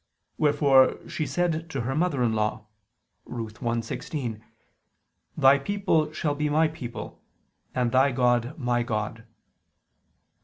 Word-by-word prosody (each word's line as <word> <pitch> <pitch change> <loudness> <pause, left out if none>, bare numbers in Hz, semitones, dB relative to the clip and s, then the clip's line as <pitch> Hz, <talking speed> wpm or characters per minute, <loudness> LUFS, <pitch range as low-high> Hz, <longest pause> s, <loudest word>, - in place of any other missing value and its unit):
Wherefore 145 -3 +4
she 155 - -3
said 170 -2 -1
to 135 -5 -3
her 125 +3 -2
mother 150 -4 +1
in 115 -2 +2
law 110 0 -1 0.6
(Ruth 115 -2 -7
1:16): 115 0 -3 1.0
"Thy 135 +1 +6
people 160 -3 0
shall 155 -1 -1
be 150 +1 -1
my 155 +2 +3
people, 130 -7 -8 0.5
and 125 -2 +1
thy 130 +2 +4
God 120 +1 +1
my 120 -4 0
God." 115 0 -3
130 Hz, 120 wpm, -26 LUFS, 120-150 Hz, 1.0 s, Thy